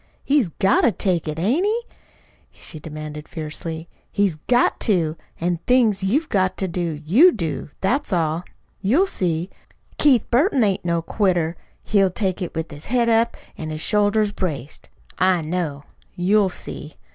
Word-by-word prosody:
He's 280 -6 +3
got 190 +4 +2
to 240 - +4
take 180 -3 -1
it, 155 0 -3
hain't 235 - +1
he?" 435 +3 +1 0.7
she 155 - -9
demanded 150 0 -7
fiercely. 160 +1 -6 0.2
"He's 200 -6 +1
GOT 245 0 +3
TO! 170 -8 +1 0.2
An' 175 0 0
things 230 -6 +3
you've 275 +12 +1
got 185 -6 +1
to 190 - -1
do, 170 -3 -3
you 265 - +7
do. 165 - -3
That's 255 +9 0
all. 165 -1 0 0.4
You'll 255 - +3
see. 175 - -2 0.5
Keith 270 -6 +4
Burton 270 - +3
ain't 200 -3 +1
no 170 -1 0
quitter. 175 -4 0 0.3
He'll 195 -2 +3
take 185 0 -2
it 175 - -4
with 160 0 -3
his 145 +1 -10
head 235 0 +1
up 230 +1 +2 0.2
an' 155 - -4
his 155 0 -4
shoulders 210 +1 +2
braced. 155 -8 -5 0.3
I 185 -3 +3
know. 155 -3 -3 0.3
You'll 195 +2 +3
see. 155 -3 -8
185 Hz, 155 wpm, -22 LUFS, 160-220 Hz, 0.7 s, you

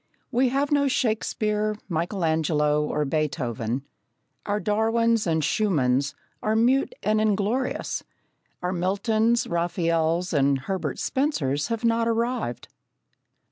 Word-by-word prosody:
We 255 +1 +3
have 275 +3 0
no 285 -1 +3
Shakespeare, 215 -3 0
Michelangelo, 160 -4 +1
or 150 0 -1
Beethoven; 135 -5 -2 0.6
our 205 0 0
Darwins, 225 +2 +1
our 165 - +2
Schumanns 145 -5 +1 0.3
are 215 +1 0
mute 260 - +2
and 215 0 +2
inglorious; 215 +5 0 0.6
our 180 +1 0
Miltons, 215 +6 +1
Raphaels, 170 0 0
and 140 -2 +2
Herbert 165 -3 -3
Spencers 155 - 0
have 230 0 -2
not 230 0 +2
arrived. 230 - -1
195 Hz, 105 wpm, -25 LUFS, 155-230 Hz, 0.6 s, We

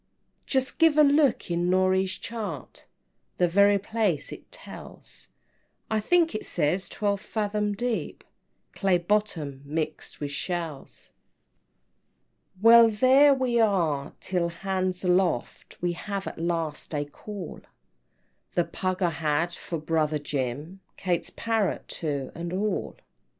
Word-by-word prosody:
"Just 265 +1 -1
give 325 -2 +5
a 305 - +8
look 280 - +3
in 175 +1 +1
Norey's 185 0 +2
chart, 225 -1 -6 0.5
The 180 - +3
very 200 +3 +5
place 205 -6 -1
it - - -11
tells; - - -10 0.6
I 220 - +2
think 335 +9 +3
it 215 - -3
says 175 +4 -1
twelve 200 -2 -1
fathom 210 -1 -1
deep, 240 0 -3 0.5
Clay 190 -2 +2
bottom, 170 -7 -1
mixed 155 +2 -4
with 145 -1 -4
shells." 165 -3 -5 1.4
VIII. 185 - -19
"Well, 230 0 +9
there 265 +6 +5
we 250 -3 +1
are 165 -10 +1
till 180 -2 -1
'hands 185 +1 -2
aloft,' 180 -8 0
We 175 - +2
have 195 +3 -4
at - - -6
last 165 -2 -2
a 145 0 -1
call; 190 +5 -8 0.9
The 175 - +3
pug 185 0 -2
I 175 - +3
had 160 +2 0
for 170 - -5
brother 155 -1 0
Jim, 145 +5 -4 0.2
Kate's 175 -3 -1
parrot 225 -4 -1
too, 145 -4 -3
and 170 0 -5
all." 205 +3 -2
IX. - - -30
185 Hz, 130 wpm, -27 LUFS, 165-215 Hz, 1.4 s, Well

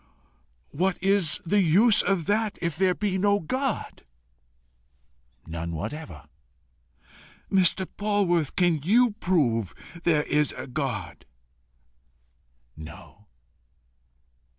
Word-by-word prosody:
"What 185 +4 0
is 195 -5 +2
the 205 +4 +3
use 200 +6 +5
of 190 -5 0
that 210 +1 0
if 170 -3 -2
there 185 +1 +2
be 195 -3 -1
no 205 +1 +3
God?" 255 - -3 1.4
"None 85 +1 -5
whatever." 85 - -6 1.3
"Mr. 190 0 +3
Polwarth, 195 -7 0
can 175 -4 +2
you 230 - +4
prove 115 - 0 0.3
there 155 -4 +2
is 150 0 0
a - - -6
God?" 125 - -5 1.5
"No." 80 +4 -13
170 Hz, 95 wpm, -26 LUFS, 135-200 Hz, 1.5 s, use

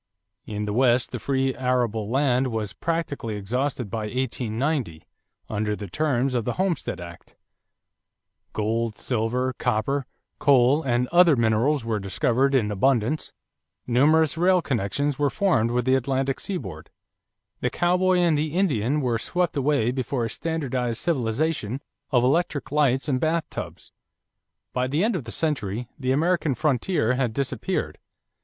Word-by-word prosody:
In 105 0 -3
the 105 - -2
West 125 0 +3
the - - -4
free 135 -1 0
arable 120 -4 0
land 130 0 +2
was 110 -4 -3
practically 155 -9 -3
exhausted 125 +3 -2
by 110 -2 -2
1890 125 - -2 0.4
under 105 0 -1
the 105 -1 -7
terms 135 - 0
of 120 -2 0
the - - -2
Homestead 180 - -1
Act; 85 -1 -11 1.2
gold, 110 +1 -1
silver, 125 +2 -1
copper, 135 +5 0 0.3
coal 135 +1 +4
and 125 -3 0
other 175 -3 +6
minerals 115 +4 +1
were 110 -2 -1
discovered 115 +8 +1
in 105 -5 +2
abundance; 125 +6 +1 0.5
numerous 155 +6 +3
rail 180 +1 +4
connections 140 - -1
were 145 -1 +3
formed 180 - +2
with 120 0 0
the 130 - +3
Atlantic 135 +1 0
seaboard; 95 - -5 0.7
the 125 - 0
cowboy 180 +4 +2
and 170 -3 +3
the 150 +1 -1
Indian 150 - +1
were 120 -4 0
swept 175 +7 -1
away 140 -4 +2
before 125 -1 -2
a 115 - -4
standardized 130 -8 -2
civilization 135 -3 -1 0.3
of 125 -4 +3
electric 145 +2 0
lights 140 -3 +2
and 130 -3 +1
bathtubs. 160 +3 -3 0.8
By 125 0 0
the 150 +7 0
end 225 0 +1
of 150 -10 -4
the 115 - -7
century 120 -7 -2
the 130 -1 0
American 160 0 +1
frontier 130 -1 +1
had 125 -3 0
disappeared. 140 +2 -2
130 Hz, 140 wpm, -24 LUFS, 115-150 Hz, 1.2 s, other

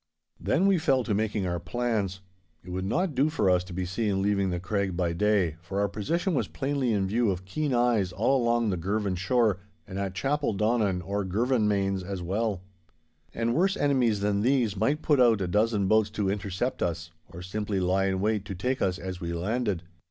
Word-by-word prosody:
Then 185 - +1
we 195 -3 +4
fell 135 -5 +2
to 115 - -1
making 105 -1 0
our 85 -1 -1
plans. 100 0 -2 0.4
It 90 - -9
would 95 +1 -3
not 170 - 0
do 135 +4 +2
for 140 -12 +2
us 90 0 +3
to 95 - -11
be 90 +1 -2
seen 95 +1 -1
leaving 100 -1 +1
the 90 -1 -2
Craig 95 -1 -2
by 85 -2 0
day, 95 -3 +1
for 95 +3 -4
our 100 - +2
position 165 - -1
was 140 - 0
plainly 135 -3 -1
in 100 -3 +1
view 110 +3 +1
of 95 -1 -3
keen 145 +10 -2
eyes 120 -6 +2
along 120 +2 +2
all 110 - 0
the 90 - -1
Girvan 100 +3 -1
shore 105 +1 +1 0.3
and 95 -1 -6
at 95 -1 -3
Chapeldonnan 110 -7 0
or 100 +1 -1
Girvanmains 100 -2 +1
as 95 +1 -5
well. 100 +1 -1 0.7
And 115 +4 -1
worse 190 +6 +2
enemies 125 -7 +2
than 100 0 +1
these 120 -3 +2
might 145 +10 0
put 145 -4 +3
out 115 -4 +5
a 95 - -1
dozen 105 +1 +1
boats 110 +1 +3
to 105 -2 -1
intercept 100 +4 -3
us, 85 0 -2 0.2
or 90 +2 -9
simply 100 +1 -2
lie 95 +1 +1
in 95 -1 0
wait 105 0 0
to 95 - -5
take 125 +8 -2
us 95 -1 +1
as 95 -1 -6
we 85 0 -3
landed. 100 +1 -1
105 Hz, 205 wpm, -27 LUFS, 95-120 Hz, 0.7 s, out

